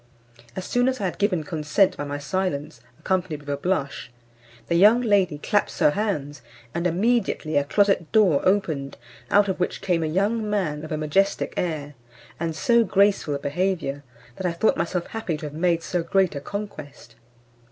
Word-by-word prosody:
As 185 - -5
soon 245 +1 +1
as 260 -1 -3
I 200 - -2
had 180 - -3
given 185 -6 +1
consent 155 +5 +1
by 145 - -4
my 145 0 -4
silence, 150 -5 -3 0.2
accompanied 180 -5 -2
with 145 - -11
a - - 0
blush, 140 -6 -2 0.6
the - - 0
young 210 +7 +6
lady 200 -9 +2
claps 205 +7 0
her - - +4
hands, 150 - -2 0.3
and 170 +1 0
immediately 190 -3 0
a 145 - +4
closet 195 +1 +1
door 200 -10 +4
opened, 160 -8 0 0.3
out 205 0 +4
of 190 - -2
which 180 - -1
came 180 -4 0
a 160 - 0
young 210 +6 0
man 165 -8 -1
of 155 - -8
a 155 - -1
majestic 190 +7 0
air, 150 -4 -3 0.5
and 165 -1 -2
so 235 +8 +3
graceful 195 -6 +2
a - - -1
behaviour, 145 -1 -2 0.4
that 190 - -1
I 170 - -1
thought 170 +6 +2
myself 175 +1 -2
happy 220 -8 -4
to 155 - -7
have 145 - -6
made 170 +1 +1
so 175 0 -1
great 185 +2 +1
a 140 - -5
conquest. 200 -7 -8
175 Hz, 185 wpm, -24 LUFS, 150-200 Hz, 0.6 s, young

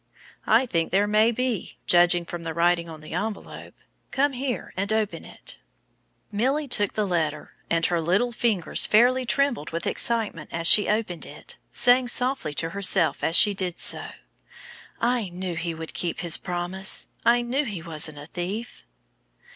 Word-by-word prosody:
"I 230 +4 +4
think 165 -9 -2
there 195 +3 +2
may 215 +2 +3
be, 245 -3 -3
judging 175 0 +4
from 175 0 -7
the 165 -1 -6
writing 170 0 +1
on 155 -1 -10
the 155 - -10
envelope. 215 0 -6 0.3
Come 280 +1 0
here 255 -1 -4
and 200 +3 -2
open 215 -6 -1
it." - - -10 0.7
Milly 265 +8 0
took 205 -5 -1
the 215 - -1
letter, 160 -5 -2 0.2
and 165 0 +1
her 170 -2 0
little 190 +9 +1
fingers 220 -6 +2
fairly 250 +3 +3
trembled 275 - 0
with 165 +1 -5
excitement 220 -9 0
as 170 0 -3
she 205 +4 +6
opened 210 -6 -2
it, - - -10
saying 245 0 +4
softly 250 - 0
to 165 +2 -3
herself 195 -4 +2
as 165 - +1
she 205 - +7
did 185 -3 -2
so, - - +2 0.9
"I 235 -4 0
knew 180 0 -5
he 165 0 -3
would 160 0 -7
keep 170 -2 -3
his 170 -2 +4
promise. 180 +2 -1 0.2
I 240 +1 +3
knew 260 +5 -1
he 200 - -6
wasn't 155 -2 -3
a 145 - -9
thief." 190 +8 -6
195 Hz, 165 wpm, -24 LUFS, 170-235 Hz, 0.9 s, she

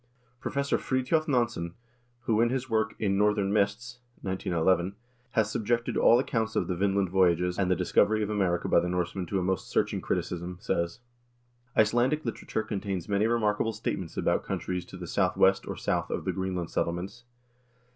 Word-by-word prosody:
Professor 140 +2 -1
Fridtjof 135 +5 0
Nansen, 120 - 0 0.5
who 115 -2 +1
in 120 - +4
his 130 0 -2
work 110 -2 0
"In 100 -2 0
Northern 105 -1 +2
Mists" 110 +5 0 0.2
(1911) 95 0 +1 0.4
has 110 -4 +2
subjected 115 +2 0
all 120 - +6
accounts 115 -3 -1
of - - +1
the 90 - -1
Vinland 100 0 +1
voyages 90 -1 +2
and 95 -2 +1
the 90 - +3
discovery 110 +5 +2
of 105 - -2
America 95 -4 0
by - - +5
the 90 +1 -1
Norsemen 90 0 -2
to 95 - -1
a 95 - 0
most 95 0 -1
searching - - 0
criticism, 90 +1 -3
says: 85 +6 -2 0.8
"Icelandic 120 +7 +3
literature 115 -1 -3
contains 95 -5 -3
many 100 +2 +2
remarkable 115 -1 +1
statements 95 -5 -4
about - - +1
countries 90 -1 -3
to 90 - -10
the 90 - -7
southwest 95 +2 +2
or - - -4
south - - -1
of - - -3
the - - +1
Greenland 95 -3 -3
settle 85 - 0
ments. 95 +8 -7
100 Hz, 170 wpm, -28 LUFS, 90-115 Hz, 0.8 s, all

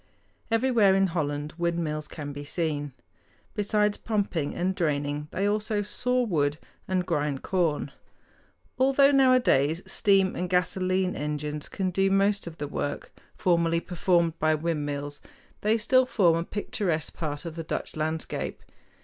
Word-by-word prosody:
Everywhere 225 -4 +4
in 195 0 +4
Holland 150 -4 -2
windmills 165 -3 -1
can 145 -2 -7
be 145 +1 -6
seen. 145 -2 -2 0.6
Besides 210 0 +1
pumping 195 -9 -1
and 185 +2 0
draining, 145 -3 -1
they 195 +4 -1
also 210 0 0
saw 250 +4 0
wood 150 -9 0 0.3
and 185 -1 0
grind 150 -5 -1
corn. 165 -6 0 0.9
Although 275 +2 +5
nowadays 245 - +4
steam 195 -2 +2
and 180 0 -3
gasolene 185 +1 +1
engines 150 0 -3
can 190 -2 -2
do 195 +2 +2
most 195 0 +2
of 165 -1 -8
the 145 - -4
work 145 0 -4 0.2
formerly 170 -2 +2
performed 170 -1 +1
by 155 0 +3
windmills, 145 -3 -3 0.4
they 215 +2 +3
still 255 +3 +3
form 180 -10 +3
a 165 - 0
picturesque 175 -6 -2
part 150 -1 -4
of 165 -2 -6
the 165 - -4
Dutch - - -4
landscape. 155 +1 -3
170 Hz, 140 wpm, -27 LUFS, 150-200 Hz, 0.9 s, Although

